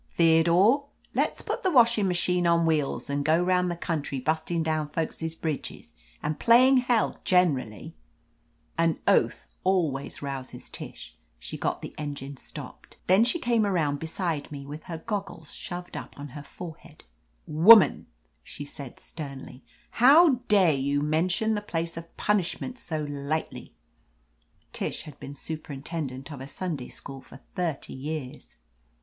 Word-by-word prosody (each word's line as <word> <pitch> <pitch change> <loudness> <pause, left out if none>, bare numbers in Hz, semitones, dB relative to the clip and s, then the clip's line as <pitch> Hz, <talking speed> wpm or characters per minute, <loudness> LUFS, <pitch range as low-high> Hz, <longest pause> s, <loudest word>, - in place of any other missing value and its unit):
Theodore, 175 - +4 0.3
let's - - 0
put - - -3
the 380 - +2
washing 235 - +5
machine 180 0 +1
on 170 0 +4
wheels 155 -4 0
and 140 0 -1
go 155 +3 +3
round 180 0 +2
the 175 - -2
country 155 -5 -3
bustin' 160 +4 0
down 155 -1 0
folks' 160 +1 -3
bridges 155 -3 -5 0.3
and 150 0 -2
playin' 255 +3 +6
hell 245 -3 +1
generally 145 - +1 0.4
!" - - -40
An 165 -1 +3
oath - - +2
always 160 -9 0
rouses 135 -2 -5
Tish. - - -9 0.2
She - - -7
got - - -2
the - - -7
engine 140 -2 -5
stopped. - - -10
Then 190 +4 +5
she 240 +8 +2
came 235 -7 +2
around 160 -8 +1
beside 160 -2 -3
me 140 -2 -7
with 150 +2 -8
her 170 -3 -5
goggles 195 -3 -5
shoved 175 0 -7
up - - -7
on 145 0 -7
her 145 +3 -8
fore 160 +2 -9
head. 155 -2 -18 0.4
"Woman," 185 +7 +7 0.4
she 145 - -8
said 140 -3 -9
sternly, 140 -4 -8 0.4
"how 285 +1 +7
dare 190 -6 +5
you 140 +1 0
mention 170 +8 +1
the 210 - -1
place 165 -5 -3
of 165 0 -10
punishment 210 +5 -1
so 155 -3 -3
lightly!" 145 +2 -4 1.0
Tish - - -3
had 150 -3 -12
been 140 - -8
superintendent 145 -2 -6
of 140 -3 -7
a 135 - -7
Sunday 150 -4 -4
school 135 -1 -8
for 135 - -14
thirty 170 -6 -2
years. 140 -1 -6
160 Hz, 150 wpm, -27 LUFS, 145-185 Hz, 1.0 s, Woman